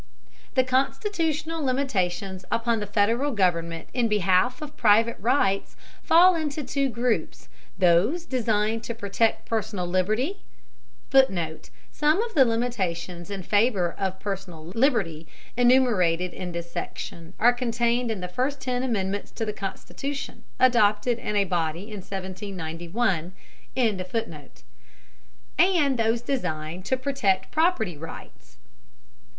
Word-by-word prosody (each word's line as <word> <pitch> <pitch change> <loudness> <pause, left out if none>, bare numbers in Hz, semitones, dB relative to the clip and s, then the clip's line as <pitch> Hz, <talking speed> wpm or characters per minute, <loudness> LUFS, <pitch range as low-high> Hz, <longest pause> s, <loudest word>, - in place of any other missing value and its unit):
] - - -29
The 260 - +5
constitutional 320 - -1
limitations 195 -8 -1
upon 230 -1 +1
the 210 - -4
Federal 225 +7 +2
government 170 -5 0
in 245 -2 +2
behalf 205 +3 +2
of 300 -1 -8
private 225 +2 +4
rights 200 -3 +1 0.3
fall 355 +3 +6
into 310 -3 -2
two 275 +1 0
groups: 235 0 -2 0.3
those 190 - +3
designed 225 -4 0
to 235 - -4
protect 225 +1 0
personal 215 -4 -2
liberty, 215 - 0 0.7
[Footnote: 185 -13 +2 0.2
Some 300 +4 +2
of 470 - -6
the 270 -5 +6
limitations 190 -7 -2
in 195 -2 -5
favor 205 -4 +2
of 190 -1 -3
personal 190 -6 -5
liberty 195 - +1 0.3
enumerated 215 -9 +3
in 180 -1 -5
this 170 0 -6
section 170 +2 -6
are 240 +3 +6
contained 240 0 0
in 215 -4 -3
the 180 - -3
first 260 +9 -2
ten 250 -1 -2
amendments 205 -5 -2
to 225 - -3
the 210 - -3
Constitution, 270 +8 -5 0.2
adopted 235 -1 +3
in 210 -3 -3
a 200 - +4
body 175 +3 -2
in 210 - -6
1791.] 185 -1 -3 0.4
and 220 -7 +2 2.0
those 225 +1 +2
designed 180 - -3
to 260 - +1
protect 255 -9 0
property 310 - +1
rights. - - -11
215 Hz, 125 wpm, -25 LUFS, 185-255 Hz, 2.0 s, fall